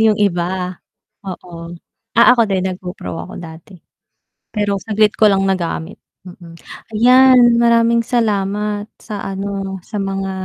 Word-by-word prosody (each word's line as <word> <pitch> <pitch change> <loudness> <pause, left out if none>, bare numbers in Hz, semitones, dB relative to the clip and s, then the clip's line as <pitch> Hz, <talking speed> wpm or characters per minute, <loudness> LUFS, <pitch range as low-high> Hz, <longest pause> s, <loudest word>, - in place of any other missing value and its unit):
'Yung 220 -1 +4
iba. 175 -3 0 0.8
Oo, 175 -2 -8 0.4
ah, 235 - +6
ako 240 -2 +3
din 190 -2 0
nag-GoPro 180 0 -7 0.2
ako - - -10
dati. 165 +3 -12 0.8
Pero 205 -2 0
saglit 215 0 +1
ko 215 - +4
lang 195 -1 +2
nagamit. 175 -3 -3 0.3
Mm, 175 -2 -13 0.4
ayan, 255 +3 +6 0.2
maraming 235 0 +3
salamat 210 -2 -1
sa 210 -2 -7
ano, 195 0 -4
sa 210 -2 -4
mga 195 0 -3
200 Hz, 125 wpm, -17 LUFS, 185-215 Hz, 0.8 s, ah